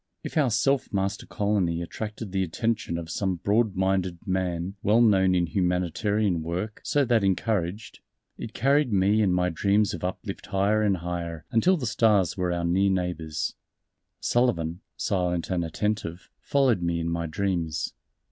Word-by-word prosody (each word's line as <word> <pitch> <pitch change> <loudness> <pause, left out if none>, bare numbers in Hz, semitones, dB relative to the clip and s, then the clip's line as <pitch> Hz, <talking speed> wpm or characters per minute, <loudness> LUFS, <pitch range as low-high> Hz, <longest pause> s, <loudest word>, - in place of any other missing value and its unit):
If - - -6
our 150 -5 +3
Self 135 +4 +1
Master 100 -1 -2
Colony 100 -6 0
attracted 105 +3 -6
the 95 0 0
attention 95 +1 -1
of 85 -1 -6
some 95 -1 -1
broad 105 +3 +1
minded 95 -1 0
man 95 -1 -1
well 110 +3 +3
known 95 -5 +4
in 90 -1 +2
humanitarian 90 +2 0
work 90 +7 -4
so 145 -1 +2
that 115 -4 +2
encouraged, 100 +1 -1 0.4
it - - -8
carried 140 +1 +2
me 100 +2 +3
and 100 -3 +3
my 90 0 +2
dreams 100 +4 +2
of 85 - -6
uplift 95 +2 -5
higher 100 +2 +2
and 100 -3 +2
higher 85 -2 -5
until 180 +12 +3
the 135 - -4
stars 105 -5 +2
were 90 -2 -1
our 85 -1 -1
near 95 +3 +3
neighbors 90 -4 -2 0.7
Sullivan, 90 -9 0 0.2
silent 90 -3 -1
and 90 -2 0
attentive, 90 0 -3
followed 130 -8 +2
me 85 -1 0
in 85 - -2
my 85 0 -2
dreams. 85 -2 -2
95 Hz, 155 wpm, -26 LUFS, 85-105 Hz, 0.7 s, known